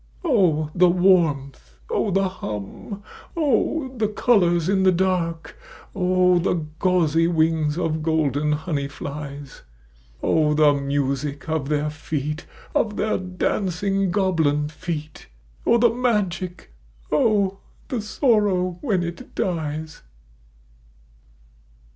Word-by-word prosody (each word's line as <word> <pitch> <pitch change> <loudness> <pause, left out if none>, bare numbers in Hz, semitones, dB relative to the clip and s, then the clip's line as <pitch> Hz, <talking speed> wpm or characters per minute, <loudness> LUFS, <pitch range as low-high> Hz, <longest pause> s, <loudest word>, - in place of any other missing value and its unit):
O! 175 - +2
the 180 0 +5
warmth! 150 - +2
O^! 205 - 0
the 195 +1 +2
hum! 185 - -7 0.3
O! 290 -1 +1
the 220 -3 +1
colours 180 -6 +2
in 195 0 +2
the 190 0 +5
dark! 175 -2 -1 0.4
O! 180 -1 +3
the 170 -2 0
gauzy 165 -3 +2
wings 160 -2 +1
of 160 -3 -1
golden 150 -2 +1
honey 150 -2 -2
flies! 140 -1 -8 0.6
O! 150 -1 +2
the 150 -1 +5
music 140 +1 -2
of 155 -3 -2
their 150 0 0
feet 150 0 -4
— - - -22
of 210 -2 +1
their 215 -1 0
dancing 190 +1 -1
goblin 160 -6 +1
feet! 155 -2 -6 0.4
O! 235 - +5
the 235 0 +5
magic! 190 - -2 0.4
O! 195 +2 +2 0.3
the 245 -4 -2
sorrow 205 - +1
when 200 -10 0
it 170 0 -7
dies. 155 -3 -3
170 Hz, 110 wpm, -23 LUFS, 150-195 Hz, 0.6 s, the